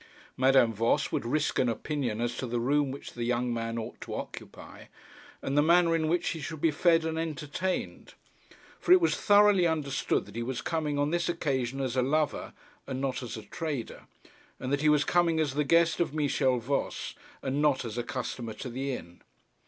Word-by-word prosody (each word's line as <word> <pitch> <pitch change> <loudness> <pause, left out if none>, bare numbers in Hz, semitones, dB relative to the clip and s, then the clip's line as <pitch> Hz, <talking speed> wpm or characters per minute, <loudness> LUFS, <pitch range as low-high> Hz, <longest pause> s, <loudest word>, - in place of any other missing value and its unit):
Madame 130 -3 +4
Voss 115 +3 +1
would 115 - -2
risk 150 +4 0
an 125 - +3
opinion 120 -2 -2
as 120 0 -1
to 130 - -4
the 120 0 -1
room 140 +3 +2
which 135 +1 -8
the 120 - -4
young 120 0 0
man 115 0 -3
ought 110 - -6
to - - -5
occupy, - - -9 0.6
and 135 - -2
the 145 - +5
manner 170 +1 +4
in 160 -1 0
which 175 +2 +1
he 165 - -4
should 155 +2 -5
be 160 +1 +3
fed 165 +2 +3
and 160 0 -2
entertained. 165 +3 -3 0.6
For - - -1
it 370 - +8
was 340 - +2
thoroughly 205 -3 +5
understood 150 -4 -1
that 100 - -14
he 115 - -2
was 125 +1 -3
coming 155 -3 -1
on 145 +1 +1
this 175 0 0
occasion 135 -6 -1
as 130 -2 -2
a 130 - +3
lover 150 +3 0 0.3
and 130 -1 -3
not 135 -1 -2
as 120 -2 -6
a 110 - -8
trader, 145 -5 -5 0.5
and 130 +1 -3
that 140 - +1
he 155 - +4
was 150 -1 +4
coming 170 0 +2
as 150 -4 0
the 150 +2 +1
guest 165 +3 +3
of 165 -3 0
Michel 140 -3 +2
Voss, 130 +4 -2 0.3
and 135 +2 -1
not 145 -4 +2
as 115 -2 -5
a 120 - -1
customer 115 -1 -4
to 125 - -6
the 135 +3 -3
inn. 85 -7 -9
140 Hz, 205 wpm, -29 LUFS, 125-160 Hz, 0.6 s, it